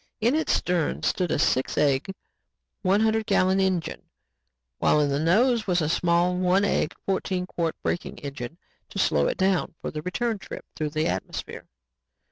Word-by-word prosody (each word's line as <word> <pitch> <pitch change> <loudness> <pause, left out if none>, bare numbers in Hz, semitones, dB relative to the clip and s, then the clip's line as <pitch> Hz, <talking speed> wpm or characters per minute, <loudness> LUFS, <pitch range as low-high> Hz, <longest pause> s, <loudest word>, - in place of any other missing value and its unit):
In 235 +3 +2
its 315 +1 +1
stern 175 -3 0
stood 180 -2 0
a - - +1
six 130 -2 +1
egg, 140 +4 +2 0.7
one 195 +2 +3
hundred 220 0 +1
gallon 190 +1 +3
engine, 190 -3 -1 0.7
while 150 - +3
in 145 -1 +2
the 140 0 0
nose 220 - +3
was 180 -2 +2
a 155 - 0
small, 175 +2 +2
one 185 +2 +2
egg, - - 0
fourteen 185 -1 -1
quart 170 -3 -2
braking 175 - -2
engine 140 +1 -7 0.3
to - - -9
slow 75 -2 +2
it - - -2
down 190 -3 +1
for - - -5
the 155 - -5
return 220 +6 -2
trip - - -9
through 155 -1 -2
the 155 +1 -1
atmosphere. 90 +1 -5
180 Hz, 170 wpm, -25 LUFS, 155-195 Hz, 0.7 s, one